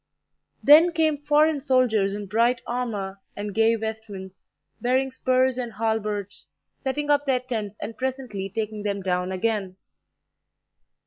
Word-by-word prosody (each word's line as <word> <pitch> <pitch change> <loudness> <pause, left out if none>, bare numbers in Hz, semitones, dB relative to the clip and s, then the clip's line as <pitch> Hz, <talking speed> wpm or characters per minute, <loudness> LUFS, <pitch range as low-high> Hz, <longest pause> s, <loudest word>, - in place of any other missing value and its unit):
Then 320 +4 +8
came 315 -2 +2
foreign 295 +1 +2
soldiers 235 -7 +2
in 205 0 -5
bright 230 +5 +2
armour 205 -6 -3
and 205 0 -5
gay 225 +2 +4
vestments, 215 -4 -7 0.3
bearing 260 +2 +1
spurs 255 0 +1
and 240 -3 -4
halberds, 210 -2 -2 0.3
setting 290 +2 -1
up 290 0 +2
their 255 -2 +2
tents, 220 -5 -4
and 225 - -6
presently 255 -7 -4
taking 215 +1 -4
them 200 -1 -2
down 180 0 -1
again. 195 -1 -1
225 Hz, 130 wpm, -25 LUFS, 205-260 Hz, 0.3 s, Then